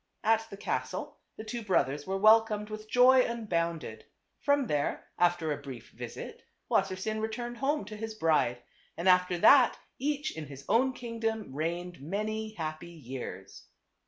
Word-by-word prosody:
At 225 Hz, 0 st, +3 dB
the 200 Hz, -, -9 dB
castle -, -, -3 dB, 0.2 s
the 215 Hz, -, -6 dB
two 230 Hz, +2 st, -5 dB
brothers 145 Hz, -7 st, +1 dB
were 190 Hz, +1 st, -1 dB
welcomed 215 Hz, 0 st, +4 dB
with 215 Hz, 0 st, -7 dB
joy 255 Hz, +1 st, +6 dB
unbounded; 170 Hz, -9 st, -2 dB, 0.4 s
from 285 Hz, -1 st, +2 dB
there, 145 Hz, -8 st, -1 dB
after 175 Hz, -3 st, +2 dB
a 145 Hz, -1 st, -3 dB
brief 135 Hz, -4 st, -9 dB
visit, -, -, -8 dB, 0.3 s
Wassersein 195 Hz, +3 st, 0 dB
returned 240 Hz, +2 st, -4 dB
home 290 Hz, +4 st, 0 dB
to 215 Hz, -, -8 dB
his 220 Hz, +1 st, -5 dB
bride. 150 Hz, -, +1 dB, 0.3 s
And 170 Hz, -, -2 dB
after 180 Hz, -1 st, +4 dB
that 255 Hz, +7 st, +6 dB, 0.2 s
each 295 Hz, +2 st, -1 dB
in 155 Hz, -2 st, -6 dB
his 140 Hz, 0 st, -10 dB
own 255 Hz, +5 st, +3 dB
kingdom 225 Hz, -, -3 dB
reigned 170 Hz, +2 st, -3 dB
many 215 Hz, +6 st, -3 dB
happy 160 Hz, 0 st, -5 dB
years. 130 Hz, -, -8 dB
210 Hz, 150 wpm, -30 LUFS, 165-225 Hz, 0.4 s, joy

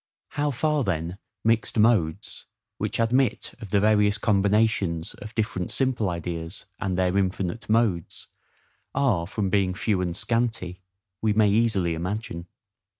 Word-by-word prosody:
How 145 Hz, +1 st, -1 dB
far 145 Hz, +2 st, +1 dB
then 85 Hz, -1 st, -2 dB, 0.2 s
mixed 115 Hz, +1 st, +1 dB
modes, 105 Hz, -8 st, +1 dB, 0.3 s
which -, -, -2 dB
admit 125 Hz, +3 st, +1 dB
of 105 Hz, -, -7 dB
the 100 Hz, -, +3 dB
various 105 Hz, 0 st, +3 dB
combinations 100 Hz, -5 st, +1 dB
of 105 Hz, +2 st, -10 dB
different 105 Hz, -5 st, -1 dB
simple 120 Hz, -2 st, 0 dB
ideas, 85 Hz, 0 st, -5 dB
and 95 Hz, -2 st, -1 dB
their 90 Hz, 0 st, +1 dB
infinite 95 Hz, +2 st, -1 dB
modes, 110 Hz, -7 st, +1 dB, 0.7 s
are 105 Hz, -12 st, +2 dB
from 100 Hz, -1 st, -2 dB
being 95 Hz, -3 st, +2 dB
few 105 Hz, -2 st, 0 dB
and 90 Hz, 0 st, -2 dB
scanty, 110 Hz, -6 st, -1 dB, 0.4 s
we 110 Hz, -1 st, +2 dB
may 105 Hz, -1 st, +4 dB
easily 105 Hz, -6 st, +2 dB
imagine. 85 Hz, 0 st, -4 dB
105 Hz, 135 wpm, -25 LUFS, 90-115 Hz, 0.7 s, may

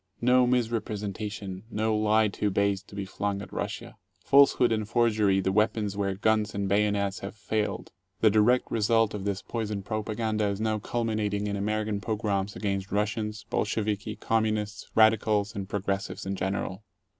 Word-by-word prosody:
No 125 Hz, +1 st, +4 dB
mis 120 Hz, -2 st, +2 dB
representation, 105 Hz, -3 st, -4 dB
no 110 Hz, -1 st, 0 dB
lie 110 Hz, +1 st, +3 dB
too 105 Hz, 0 st, -1 dB
base 100 Hz, 0 st, +1 dB
to 100 Hz, -, -15 dB
be 100 Hz, -1 st, -3 dB
flung 100 Hz, +1 st, -2 dB
at -, -, -12 dB
Russia. -, -, -5 dB, 0.3 s
Falsehood 140 Hz, -3 st, +5 dB
and 110 Hz, -1 st, -1 dB
forgery 110 Hz, -5 st, +3 dB
the 95 Hz, 0 st, 0 dB
weapons 105 Hz, 0 st, +1 dB
where 100 Hz, -1 st, -1 dB
guns 105 Hz, +1 st, +1 dB
and 100 Hz, 0 st, -1 dB
bayonets 100 Hz, -1 st, +1 dB
have 100 Hz, +2 st, -7 dB
failed. 105 Hz, 0 st, -2 dB, 0.3 s
The 110 Hz, -, +5 dB
direct 110 Hz, +4 st, +3 dB
result 115 Hz, 0 st, +2 dB
of 100 Hz, -2 st, -5 dB
this 100 Hz, -1 st, -2 dB
poison 105 Hz, -4 st, -3 dB
propaganda 110 Hz, 0 st, -1 dB
is 100 Hz, 0 st, -2 dB
now 110 Hz, -1 st, 0 dB
culminating 105 Hz, -2 st, -1 dB
in 100 Hz, -1 st, -2 dB
American 105 Hz, 0 st, -1 dB
pogroms 105 Hz, -3 st, -1 dB
against 100 Hz, -2 st, -2 dB
Russians, 105 Hz, +1 st, -2 dB
Bolsheviki, 105 Hz, 0 st, -1 dB
communists, 110 Hz, -1 st, -1 dB
radicals, 110 Hz, -1 st, +3 dB
and 100 Hz, -1 st, -5 dB
progressives 100 Hz, -1 st, -3 dB
in 95 Hz, 0 st, -2 dB
general. 95 Hz, +1 st, -3 dB
105 Hz, 155 wpm, -28 LUFS, 100-110 Hz, 0.3 s, Falsehood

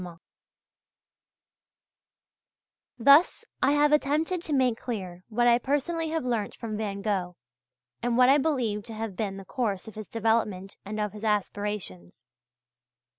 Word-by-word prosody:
Thus 280 Hz, -, +5 dB, 0.2 s
I 280 Hz, -, +4 dB
have 295 Hz, 0 st, +4 dB
attempted 305 Hz, +4 st, +1 dB
to 325 Hz, -, -7 dB
make 255 Hz, -5 st, +2 dB
clear 185 Hz, -7 st, -5 dB
what 240 Hz, +2 st, +1 dB
I 240 Hz, 0 st, +5 dB
personally 315 Hz, +5 st, -1 dB
have 320 Hz, -4 st, -2 dB
learnt 230 Hz, -4 st, -1 dB
from 225 Hz, -2 st, -5 dB
Van 200 Hz, -2 st, -4 dB
Gogh, 185 Hz, -4 st, -1 dB, 0.7 s
and 240 Hz, 0 st, 0 dB
what 250 Hz, 0 st, +6 dB
I 275 Hz, +3 st, +6 dB
believe 250 Hz, -9 st, 0 dB
to 225 Hz, -2 st, -8 dB
have 220 Hz, -3 st, -5 dB
been 195 Hz, -2 st, -3 dB
the 195 Hz, -, -9 dB
course 210 Hz, -5 st, -2 dB
of 220 Hz, -, -9 dB
his 215 Hz, -1 st, -8 dB
development 215 Hz, -4 st, -1 dB
and 215 Hz, +2 st, -5 dB
of 210 Hz, -1 st, -2 dB
his 210 Hz, 0 st, -10 dB
aspirations. 205 Hz, -, -2 dB
225 Hz, 140 wpm, -27 LUFS, 205-270 Hz, 0.7 s, what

